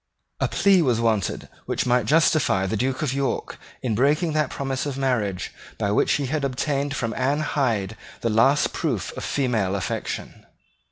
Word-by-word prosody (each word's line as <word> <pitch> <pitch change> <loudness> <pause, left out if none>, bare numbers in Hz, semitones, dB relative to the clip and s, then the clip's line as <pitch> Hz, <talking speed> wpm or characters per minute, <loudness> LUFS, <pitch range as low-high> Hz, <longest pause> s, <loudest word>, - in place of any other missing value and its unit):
A - - +2
plea 195 -3 +4
was 125 -7 +2
wanted 110 -4 0 0.2
which - - -1
might 120 -3 +2
justify 155 -9 +3
the 95 - -1
Duke 130 +6 -1
of 135 -4 0
York 140 -1 -2 0.2
in 120 -4 0
breaking 150 - +2
that 150 -2 +1
promise 135 0 -3
of 135 -2 -4
marriage 110 -9 -1 0.2
by 100 - 0
which 105 - +3
he 145 - 0
had 145 +2 -2
obtained 140 +2 -1
from 115 -5 -2
Anne 140 +6 0
Hyde 115 -9 0 0.3
the 115 - 0
last 135 +7 +3
proof - - -2
of - - -6
female 115 -9 0
affection. 100 - -4
130 Hz, 170 wpm, -24 LUFS, 110-145 Hz, 0.3 s, plea